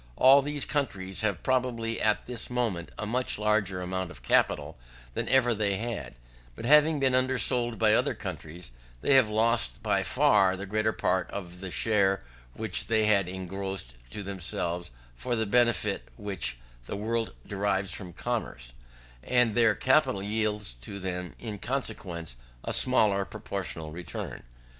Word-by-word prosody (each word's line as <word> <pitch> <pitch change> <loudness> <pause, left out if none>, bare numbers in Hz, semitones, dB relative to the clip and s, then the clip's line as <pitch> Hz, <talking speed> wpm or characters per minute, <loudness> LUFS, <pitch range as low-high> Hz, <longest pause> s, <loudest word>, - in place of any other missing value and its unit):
All 135 - +7
these 145 0 -2
countries 100 -10 -2
have 100 -5 -1
probably 120 -3 0
at 105 -1 +1
this 120 -3 -4
moment 115 -9 -1
a - - -3
much 125 +4 0
larger 105 -3 +1
amount 95 0 -3
of - - -12
capital - - +1 0.3
than - - -2
ever 125 -2 +4
they 100 -2 0
had, 115 - -5 0.4
but 115 - -7
having 150 +3 +5
been 135 -2 +2
undersold 125 -2 +2
by 110 -1 +4
other - - +2
countries, 80 -3 -7 0.3
they - - +3
have 130 -5 +6
lost 110 - +1
by - - +2
far 95 -3 +3
the 100 - -5
greater 110 +2 +1
part 95 -4 0
of 90 -3 -7
the 95 0 -5
share 100 -1 +2 0.3
which 110 -4 -2
they 110 -1 +3
had 100 -4 +3
engrossed 95 -6 -4 0.2
to 100 - -6
themselves 90 -2 -3 0.3
of 120 -2 0
the 110 - +1
benefit 115 -2 +2
which 95 - -2 0.3
the 100 - -5
world 115 - -2
derives 100 -1 -1
from 90 -3 -6
commerce; - - -4 0.5
and 125 - +2
their 115 -2 +4
capital 130 -7 +2
yields 105 - -1
to 100 +11 -6
them 90 -2 -4
in 105 -4 -6
consequence 95 - -4 0.3
a - - -2
smaller 105 -6 +4
proportional 95 -6 -5
return. 85 +2 -6
105 Hz, 150 wpm, -28 LUFS, 95-120 Hz, 0.5 s, All